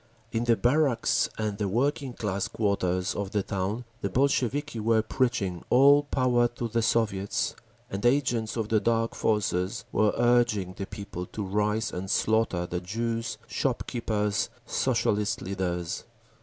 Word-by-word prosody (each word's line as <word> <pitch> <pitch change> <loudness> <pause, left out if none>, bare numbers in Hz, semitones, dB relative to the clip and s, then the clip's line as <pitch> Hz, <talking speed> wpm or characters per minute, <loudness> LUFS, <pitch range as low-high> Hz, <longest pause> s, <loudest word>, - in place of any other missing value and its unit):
In 115 +1 -1
the 120 -1 +4
barracks 125 -1 +2
and 105 -2 -2
the 105 - 0
working 130 +5 0
class 100 -4 -2
quarters 95 -3 0
of 100 -1 -3
the 105 -2 +1
town 100 +6 -2 0.2
the 100 - -1
Bolsheviki 140 +2 0
were 110 0 +2
preaching, 110 -8 -1
"All 140 +3 +7
Power 125 -4 +2
to 120 0 -5
the 115 +1 0
Soviets!" 105 -4 0 0.3
and 100 +1 -5
agents 120 -4 +1
of 110 -2 -2
the 110 - +3
Dark 115 +2 +1
Forces 100 -3 0
were 105 -1 +3
urging 120 -6 +2
the 95 +1 -6
people 90 -3 -6
to 105 - -5
rise 105 +2 0
and 95 +2 -5
slaughter 110 -6 +1
the 90 0 -3
Jews, 115 +4 -3
shop - - -1
keepers, 105 -3 -1 0.2
Socialist 105 0 0
leaders…. 90 -3 -3
110 Hz, 145 wpm, -27 LUFS, 100-120 Hz, 0.3 s, All